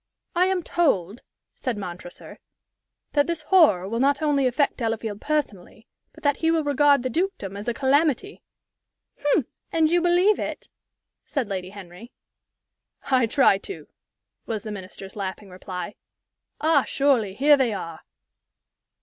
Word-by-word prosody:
"I 360 Hz, +2 st, +3 dB
am 375 Hz, -2 st, 0 dB
told," 220 Hz, -, 0 dB, 0.3 s
said 250 Hz, -4 st, -4 dB
Montresor, 175 Hz, -2 st, -9 dB, 0.7 s
"that 290 Hz, -1 st, +3 dB
this 335 Hz, -2 st, -2 dB
horror 300 Hz, -, +4 dB
will 230 Hz, +3 st, -2 dB
not 280 Hz, +2 st, +2 dB
only 290 Hz, -4 st, +2 dB
affect 275 Hz, +3 st, 0 dB
Delafield 225 Hz, -3 st, -3 dB
personally, 260 Hz, -9 st, -3 dB, 0.3 s
but -, -, -18 dB
that 285 Hz, -1 st, +2 dB
he 325 Hz, -, +1 dB
will 325 Hz, -1 st, +2 dB
regard 285 Hz, -2 st, +3 dB
the 255 Hz, -, -1 dB
dukedom 330 Hz, -, -2 dB
as 205 Hz, +3 st, -7 dB
a 240 Hz, -, +1 dB
calamity." 290 Hz, -, +1 dB, 0.8 s
"Hm! 290 Hz, -2 st, +2 dB, 0.3 s
and 320 Hz, -1 st, +2 dB
you 350 Hz, 0 st, +3 dB
believe 355 Hz, +4 st, +3 dB
it?" -, -, -5 dB, 0.5 s
said 275 Hz, -7 st, -2 dB
Lady 185 Hz, -2 st, -4 dB
Henry. 195 Hz, +3 st, -12 dB, 1.0 s
"I 255 Hz, -3 st, +4 dB
try 220 Hz, -5 st, +4 dB
to," 395 Hz, -, -9 dB, 0.6 s
was 220 Hz, -3 st, -3 dB
the 215 Hz, -, -6 dB
Minister's 190 Hz, -1 st, -9 dB
laughing 195 Hz, 0 st, -6 dB
reply. 185 Hz, +2 st, -6 dB, 0.7 s
"Ah, 310 Hz, -3 st, +3 dB
surely, 250 Hz, -9 st, +1 dB
here 290 Hz, +5 st, +6 dB
they 260 Hz, -4 st, +1 dB
are!" 165 Hz, -5 st, -6 dB
255 Hz, 140 wpm, -24 LUFS, 200-305 Hz, 1.0 s, here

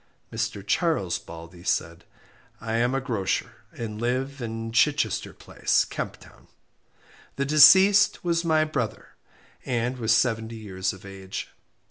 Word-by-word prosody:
Mr. 110 Hz, -3 st, -3 dB
Charles 105 Hz, -, 0 dB
Baldey 85 Hz, +1 st, -12 dB
said 85 Hz, -2 st, -2 dB, 0.5 s
I 110 Hz, 0 st, -5 dB
am 120 Hz, +3 st, +1 dB
a -, -, +1 dB
grocer, 115 Hz, -8 st, -2 dB
and 110 Hz, -2 st, -6 dB
live 130 Hz, +3 st, -2 dB
in 115 Hz, -1 st, -5 dB
Chichester 120 Hz, -2 st, +1 dB
Place, -, -, 0 dB
Kemp -, -, -5 dB
Town. -, -, -18 dB, 0.9 s
The 140 Hz, -, -1 dB
deceased 190 Hz, +8 st, +6 dB
was 170 Hz, -1 st, 0 dB
my 160 Hz, -2 st, +2 dB
brother, 140 Hz, -8 st, -4 dB, 0.5 s
and 125 Hz, 0 st, -2 dB
was 110 Hz, -2 st, 0 dB
seventy 115 Hz, -1 st, +1 dB
years 95 Hz, -4 st, -3 dB
of 95 Hz, +1 st, -13 dB
age. 95 Hz, -1 st, -7 dB
115 Hz, 130 wpm, -25 LUFS, 100-140 Hz, 0.9 s, deceased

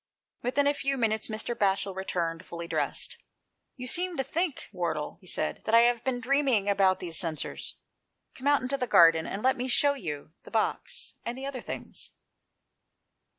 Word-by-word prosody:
Within 265 Hz, +4 st, +1 dB
a 285 Hz, -, +4 dB
few 275 Hz, -1 st, -1 dB
minutes 220 Hz, -3 st, +1 dB
Mr. 220 Hz, +2 st, -2 dB
Batchel 195 Hz, -2 st, 0 dB
returned 170 Hz, -3 st, -2 dB
fully 170 Hz, -2 st, -7 dB
dressed. -, -, -1 dB, 0.3 s
" -, -, -52 dB
You 250 Hz, -, -6 dB
seem 350 Hz, +6 st, 0 dB
to 270 Hz, -, +1 dB
think, 330 Hz, +3 st, -2 dB
Wardle," 170 Hz, -3 st, -2 dB
he 185 Hz, -, -14 dB
said, -, -, -1 dB
" -, -, -33 dB
that 225 Hz, -, +3 dB
I 230 Hz, -, +9 dB
have 240 Hz, -1 st, +3 dB
been 255 Hz, -2 st, -1 dB
dreaming 260 Hz, -4 st, +2 dB
about 195 Hz, -2 st, +3 dB
these 170 Hz, -3 st, -3 dB
censers. 165 Hz, -4 st, -3 dB, 0.6 s
Come 265 Hz, -, -5 dB
out 285 Hz, -2 st, +4 dB
into 265 Hz, +2 st, -1 dB
the 250 Hz, -, -2 dB
garden 165 Hz, -5 st, +6 dB
and 200 Hz, -, -4 dB
let 260 Hz, +1 st, +3 dB
me 250 Hz, +1 st, -2 dB
shew 285 Hz, +3 st, +4 dB
you 155 Hz, -, -6 dB
the -, -, -13 dB
box -, -, -2 dB
and 235 Hz, +2 st, -4 dB
the 265 Hz, -, -5 dB
other 270 Hz, -3 st, -4 dB
things." -, -, -7 dB
230 Hz, 190 wpm, -29 LUFS, 185-270 Hz, 0.6 s, I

